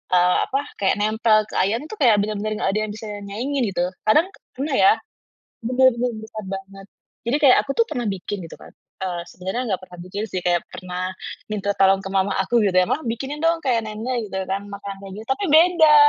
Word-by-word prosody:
eee, 180 0 +4
apa, 275 - 0 0.4
nempel 215 +1 +3
ke - - -7
ayam 210 +5 +1
itu 435 - -8
kayak 235 -6 +6
bener-bener 215 0 -2
nggak - - 0
ada 215 - +1
yang - - -5
bisa 220 - -8 0.2
nyaingin 255 +7 -2
gitu. 180 -2 0 0.2
Kadang 310 +10 +5
k - - -18 0.2
pernah 280 +1 -2
ya, 195 -4 +6 0.7
bener-bener 250 0 +3
besar 220 -1 -8
banget. 195 0 -7 0.4
Jadi 240 +4 +1
kayak 255 - +8
aku 275 - -9 0.2
pernah 245 - -3
bikin 195 +1 -4
gitu - - -9
kan. - - -14 0.3
Eee, 180 -2 -3
sebenarnya 190 +7 -3 0.2
gak - - -27
pernah 180 -1 -13
bikin 200 +4 -4
sih, 185 -3 -4
kayak 175 -1 +1
pernah 185 +1 -4 0.3
minta 205 -1 -2
tolong 195 0 +4
ke 195 - -6
mama 195 0 +1
aku 235 +5 +2
gitu 185 - 0
ya, 185 - +6
"Mah, - - +2
bikinin 265 +6 -3
dong 330 +1 +1
kayak 230 -4 +1
nenek," 225 +2 -3
gitu 190 -1 -3
kan, 200 +1 -2
makanan 200 -1 -7
kayak 190 - -9
gitu. - - -16
Tapi 405 - -2
beda. 320 -2 +6
215 Hz, 205 wpm, -22 LUFS, 195-250 Hz, 0.7 s, kayak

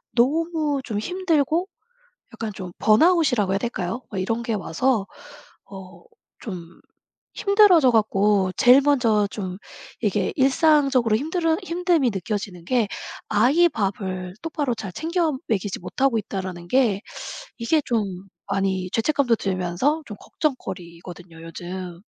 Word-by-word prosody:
너무 300 +2 +1
좀 220 -6 -3
힘들고 345 - 0 0.7
약간 225 -2 -4
좀 185 -2 -7
번아웃이라고 250 - +4
해야 195 - +1
될까요? 230 0 -3
이런 210 +5 -1
게 230 - -2
와서 205 +3 0 0.6
어 190 -1 -12 0.4
좀 180 -6 -8 0.6
힘들어져 395 - +5
갖고 205 -3 +2
제일 250 +3 +7
먼저 235 -8 +2
좀 185 -3 -5 0.4
이게 - - 0
일상적으로 275 -4 +3
힘들으 320 +4 0
힘듦이 345 -6 +1
느껴지는 195 -3 -4
게 240 0 +1 0.4
'아이 265 +12 +4
밥을 190 - -3
똑바로 295 -6 -2
잘 215 -4 -6
챙겨 330 - 0 0.2
먹이지 205 -3 -1
못하고 240 +7 0
있다.'라는 185 -4 -6
게 230 -6 +2 0.6
이게 255 +7 +2
좀 230 -4 0 0.4
많이 190 -2 -1
죄책감도 245 0 +2
들면서 195 - -1
좀 210 - -8
걱정거리거든요. 175 - -5
요즘. 175 +1 -7
225 Hz, 270 characters per minute, -23 LUFS, 190-290 Hz, 0.7 s, 제일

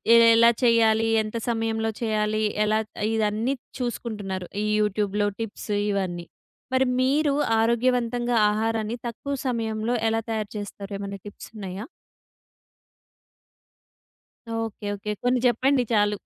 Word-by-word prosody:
ఎ - - +9 0.2
ఎలా 235 +1 +7
చేయాలి? 225 -1 +4 0.2
ఎంత 215 +2 -5
సమయంలో 225 -1 0
చేయాలి? 215 -1 0 0.2
ఎలా 215 +1 +2 0.3
ఇదన్నీ 220 +4 0 0.2
చూసుకుంటున్నారు. 210 -6 -4 0.2
ఈ - - -1
యూట్యూబ్‌లో 205 0 +1
టిప్స్ 220 -1 -5 0.2
ఇవన్నీ. 180 -3 -2 0.5
మరి 260 0 +4 0.2
మీరు 285 +2 +2 0.3
ఆరోగ్యవంతంగా 240 +1 +1
ఆహారాన్ని 225 +1 -1
తక్కువ 280 +4 -4
సమయంలో 225 -1 -1 0.2
ఎలా 225 0 0
తయారు 215 -1 -2
చేస్తారు? 205 0 -7
ఏమన్నా 200 0 -5
టిప్సున్నాయా? 205 0 -8 2.7
ఓకే. 225 -2 -4
ఓకే. 205 +1 -5
కొన్ని 250 +1 +2
చెప్పండి 255 +2 +2
చాలు. 210 -1 +3
220 Hz, 105 wpm, -25 LUFS, 210-235 Hz, 2.7 s, ఎ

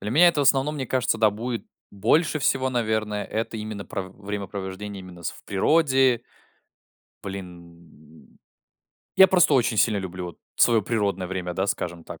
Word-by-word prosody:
Для 105 - -4
меня 170 +8 +6
это 155 -4 +1
в - - +3
основном, 140 +2 +3
мне 135 -3 -4
кажется, 125 -2 0
да, 110 -1 +4
будет 115 +3 -5 0.2
больше 150 - +2
всего, 130 -2 +1
наверное, 110 -4 -1
это 110 +1 -3
именно 105 -2 -6
про 95 - -4
в 95 +2 -14
времяпровождение 100 0 -5
именно 90 -2 -12
с - - -2
в - - -16
природе. 130 +1 +3 1.0
Блин, 85 -5 -11 0.8
я 190 - +9
просто 180 -5 +4
очень 120 -3 +2
сильно 105 0 +3
люблю 95 -1 -6
вот 85 - -10 0.2
своё 115 -2 +4
природное 100 -4 -1
время, 90 -1 -4
да, 95 +2 0
скажем 85 -4 -3
так, - - -9
105 Hz, 165 wpm, -24 LUFS, 95-125 Hz, 1.0 s, я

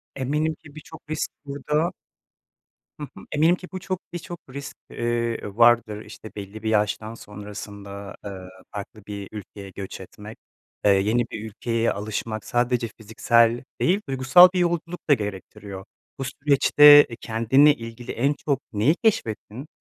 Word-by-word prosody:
Eminim 150 +4 -1
ki 145 -1 -17
birçok 155 - -11
risk 155 0 -2
burada 150 +4 -1 1.1
Hı - - -5
hı, - - -11
eminim 160 +4 +4
ki 180 - -11
bu 185 - -5
çok 185 0 -4
birçok 175 0 -7
risk, 140 +2 -7
eee, 120 -1 -1 0.2
vardır. 115 -3 +4
İşte, 110 0 -11
belli 100 +2 -8
bir 110 - 0
yaştan 110 +1 0
sonrasında, 100 -2 -9
eee, 100 - -5 0.4
farklı 105 +1 -8
bir 100 -1 -6
ülkeye 100 -1 -9
göç 95 0 -8
etmek, 105 +4 -11 0.5
eee, 100 - +6
yeni 105 +5 +2
bir 110 - -6
ülkeye 115 +2 -1
alışmak, 110 +1 -4
sadece 120 -1 0
fiziksel 115 +2 +2 0.2
değil, 190 +4 +2
duygusal 135 +7 +7
bir 185 - 0
yolculuk 175 -1 -2
da - - +8
gerektiriyor. 100 -3 -6 0.3
Bu 135 - -2
süreçte 145 +2 +6
kendinle 130 +6 +4
ilgili 115 0 -8
en 140 +5 +1
çok 140 -2 -2
neyi 115 +11 +3
keşfettin? 125 - -1
115 Hz, 140 wpm, -24 LUFS, 105-145 Hz, 1.1 s, da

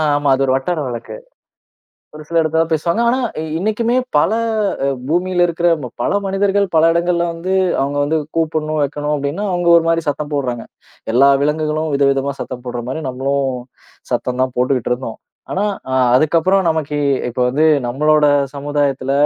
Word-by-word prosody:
ஆமா. 145 -1 +1
அது 135 - 0
ஒரு 130 - +1
வட்டார 155 +5 -1
வழக்கு. 120 - -6 1.0
ஒரு 155 0 -10
சில 170 0 +1
இடத்துலதான் 160 +1 0
பேசுவாங்க. 170 +8 0
ஆனா 260 +2 +1 0.2
இ - - -3 0.2
இன்னைக்குமே 225 +4 0 0.2
பல 170 - +3 0.5
அ - - +1 0.2
பூமில 175 +2 +1
இருக்குற 170 +1 +1
ம 125 - -6
பல - - 0
மனிதர்கள், 200 +1 +1
பல 160 - +5
இடங்கள்ல 170 0 +1
வந்து 180 +3 -3 0.3
அவங்க 140 +1 -1
வந்து 160 +2 0 0.2
கூப்பிடணும், 155 -1 -1
வைக்கணும் 145 +1 -2
அப்டின்னா 145 +9 -3
அவங்க 175 -1 +1
ஒரு 165 - +1
மாதிரி 165 -1 0
சத்தம் 145 +1 -2
போடுறாங்க. 125 -4 -3 0.5
எல்லா 135 +3 +5
விலங்குகளும் 155 +1 -1
விதவிதமா 140 0 +1
சத்தம் 125 -1 -7
போடுற 120 -1 -4
மாதிரி, 160 +4 -4
நம்மளும் 135 +2 -1 0.6
சத்தம்தான் 130 0 -1
போட்டுக்கிட்டு 125 -1 0
இருந்தோம். 125 -3 -6 0.3
ஆனா 195 - -1 0.3
அ - - +1 0.2
அதுக்கப்புறம் 165 +7 +3
நமக்கு, 150 -2 -1 0.3
இப்போ 125 +1 -3
வந்து 150 +5 +2 0.2
நம்மளோட 150 +4 +2 0.3
சமுதாயத்துல 140 -2 -1
150 Hz, 155 wpm, -17 LUFS, 135-170 Hz, 1.0 s, பல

